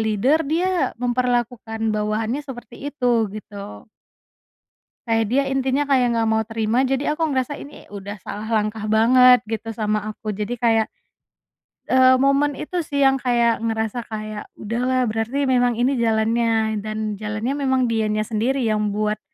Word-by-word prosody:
leader 220 +8 +2
dia 355 +3 0
memperlakukan 240 -2 -1
bawahannya 215 +4 -1
seperti 265 -1 -8
itu." 245 -6 +1
Gitu. 200 - -9 1.2
Kayak 225 -1 +2
dia 275 +2 +3
intinya 270 +1 +1
kayak 250 -3 +3
nggak 225 -1 +1
mau 220 0 +2
terima 225 +3 0
jadi 270 +3 -1
aku 325 - +1
ngerasa 260 +2 -1
ini 290 - -12
udah 205 0 -8
salah 210 +4 -6
langkah 215 0 -1
banget 250 +3 +6
gitu 225 0 -4
sama 215 -1 -1 0.2
aku 215 - -7
jadi 210 +2 -3
kayak, 225 -2 +3 1.1
eee, 260 0 +6
momen 275 +1 +2
itu 355 +3 -3
sih 285 -3 0
yang 270 0 +3
kayak 235 -2 +2
ngerasa 225 +1 -2
kayak, 215 -1 -6
“Udah 230 +3 -4
lah 255 0 +2
berarti 225 +5 -1
memang 245 -2 +2
ini 250 +2 +1
jalannya 225 -1 +1
dan 215 -1 -4
jalannya 215 +4 -2
memang 260 -2 +2
dianya 215 -1 0
sendiri 240 +5 -1
yang 215 -1 +1
buat," 210 +1 -1
230 Hz, 150 wpm, -22 LUFS, 215-260 Hz, 1.2 s, banget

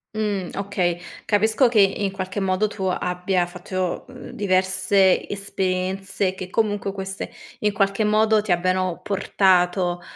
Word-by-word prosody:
Mhmm, 205 -4 -1
okay. 185 -3 -1 0.2
Capisco 220 +5 +3
che 230 -2 +3
in 195 0 +3
qualche 190 +1 -4
modo 190 +2 +1
tu 210 -2 -7
abbia 180 0 0
fatto, 180 0 -4
uhm, 255 -1 -10
diverse 190 0 +2
esperienze, 195 0 -2
e 185 - -6
che 185 -1 -7
comunque 205 -1 0
queste, 195 0 -6 0.3
in 210 - +1
qualche 195 +1 +1
modo, 215 0 +3
ti 210 -2 -3
abbiano 185 0 +1
portato, 180 -2 +2
195 Hz, 135 wpm, -23 LUFS, 185-205 Hz, 0.3 s, Capisco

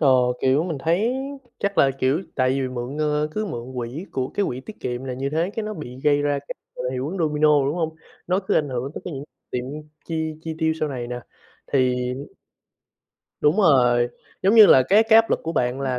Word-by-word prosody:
Ờ, 145 - +4 0.3
kiểu, 135 +4 +3
mình 165 -5 -3
thấy 180 - +1 0.5
chắc 200 -1 -2
là, 135 - +5
kiểu, 135 +7 +2
tại 130 -1 +2
vì 135 0 0
mượn, 125 +3 -5
ơ, 150 0 +1
cứ 215 - -2
mượn 125 -7 -6
quỹ 125 +8 -4
của 130 -1 -1
cái 205 - -1
quỹ 125 - -4
tiết 210 +11 -12
kiệm 125 +1 -4
là 130 -1 -4
như 135 +2 -3
thế, 165 +5 0
cái 225 - -1
nó 215 0 -4
bị 130 -6 -8
gây 145 -1 +3
ra 145 -1 +1
cái, 140 - -8 0.2
gọi - - -6
là, 125 - -2
hiệu 130 +2 -3
ứng 190 +4 -5
Domino, 150 -3 +3
đúng 140 +3 0
hông? 160 -2 -2 0.3
Nó 185 +1 +2
cứ 190 - -1
ảnh 150 - +2
hưởng 130 +1 -3
tất - - -5
cả - - -5
những 140 -3 -6 0.3
chuyện 140 +5 -5 0.2
chi 160 -1 -2
chi 160 -1 -4
tiêu 160 -1 +2
sau 155 - 0
này 125 -4 -4
nè, 125 0 -5 0.5
thì 130 -2 +3 1.5
Đúng 150 +4 +3
rồi, 125 - +4 0.3
giống 195 +4 +4
như 220 -2 +10
là 130 - +7
cái 210 +3 +6
cái 225 0 +5
áp 225 - +2
lực - - +1
của 165 - -3
bạn 125 -3 0
là 130 -2 -1
145 Hz, 235 wpm, -23 LUFS, 130-165 Hz, 1.5 s, như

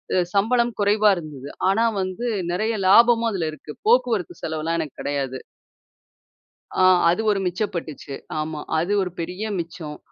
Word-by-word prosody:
அ - - +3 0.2
சம்பளம் 235 +4 +2
குறைவா 210 +1 +4
இருந்தது. 145 -5 -8 0.2
ஆனா 220 +4 +2 0.2
வந்து 185 +6 -4 0.3
நிறைய 215 +5 0
லாபமும் 230 +2 +6
அதில 170 -5 -2
இருக்கு. 155 0 -10 0.2
போக்குவரத்து 235 -6 +2
செலவுலாம் 160 +1 -2
எனக்கு 155 -4 -5
கிடையாது. 135 -2 -2 1.4
ஆ - - +6 0.3
அது 180 +6 +1
ஒரு 195 - 0
மிச்சப்பட்டுச்சு. 175 -7 -4 0.3
ஆமா 155 0 -3 0.2
அது 175 +5 -1
ஒரு 180 -2 -2
பெரிய 180 +5 -4 0.2
மிச்சம். 165 -3 -6
180 Hz, 135 wpm, -23 LUFS, 155-215 Hz, 1.4 s, லாபமும்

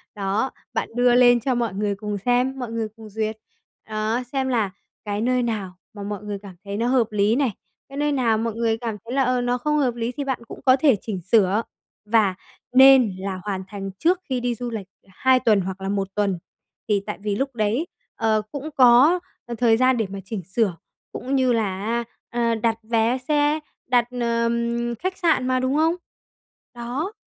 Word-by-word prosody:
Đó, 205 +5 -1 0.2
bạn - - -2
đưa 245 0 +4
lên 245 -1 +6
cho 255 +2 0
mọi 235 -5 -1
người 205 0 -1
cùng 210 0 -4
xem, 250 +5 +1
mọi 240 -2 -4
người 225 -1 -2
cùng 220 -1 -11
duyệt. 215 +1 -3 0.5
Đó, 215 +3 -1
xem 265 -1 0
là 220 -6 +1 0.3
cái 205 0 -2
nơi 250 +1 +1
nào 210 -6 -3 0.2
mà 205 -1 -7
mọi 205 +1 -5
người 205 -1 -4
cảm 195 -3 -11
thấy 200 0 -4
nó 235 +2 0
hợp 245 -4 +2
lý 210 +2 +2
này, 275 -4 +1 0.4
cái 275 - -9
nơi 295 0 +1
nào 235 -5 +2
mọi 230 0 -2
người 225 -1 +1
cảm 225 -2 -4
thấy 235 - -6
là, 270 0 +3
ờ, 255 0 +1
nó 245 0 0
không 300 +4 0
hợp 255 -5 +1
lý 235 +1 -2
thì 285 +3 -4
bạn 265 -2 -2
cũng - - -9
có 255 -1 +7
thể 270 -3 +4
chỉnh 195 -5 -4
sửa. 200 +2 +3 0.4
Và 210 -3 +3 0.4
nên 260 -6 +7
là 190 -1 -4
hoàn 195 -2 -3
thành 195 -1 -6
trước 350 +2 +3
khi 255 -1 0
đi 245 0 -1
du 245 +1 -4
lịch 205 -4 -5 0.2
2 255 +7 +2
tuần 215 -6 +3
hoặc 190 +1 -5
là 195 - -3
1 195 -1 -1
tuần, 200 -4 0 0.5
thì 205 -2 +2
tại 210 - -4
vì 205 -1 -1
lúc 270 +2 -2
đấy, 225 +9 0 0.3
ờ, 220 -2 +1
cũng 290 +2 -5
có 260 +7 +6 0.4
thời 225 -1 +4
gian 255 0 +3
để 220 - 0
mà 195 - -6
chỉnh 195 -2 -5
sửa, 190 +1 0 0.4
cũng 265 +2 -3
như 255 -2 +3
là 210 -5 0
á, 235 +1 0 0.3
ờ, 235 -1 +1
đặt 225 0 0
vé 230 +2 +1
xe, 295 +1 +2 0.3
đặt, 245 -2 +3 0.2
ờm, 235 0 0
khách 370 - -4
sạn 320 -8 +2
mà, 255 0 +2
đúng 260 +2 0
không? 320 +3 +3 0.8
Đó, 250 - -4
235 Hz, 205 wpm, -23 LUFS, 210-255 Hz, 0.8 s, có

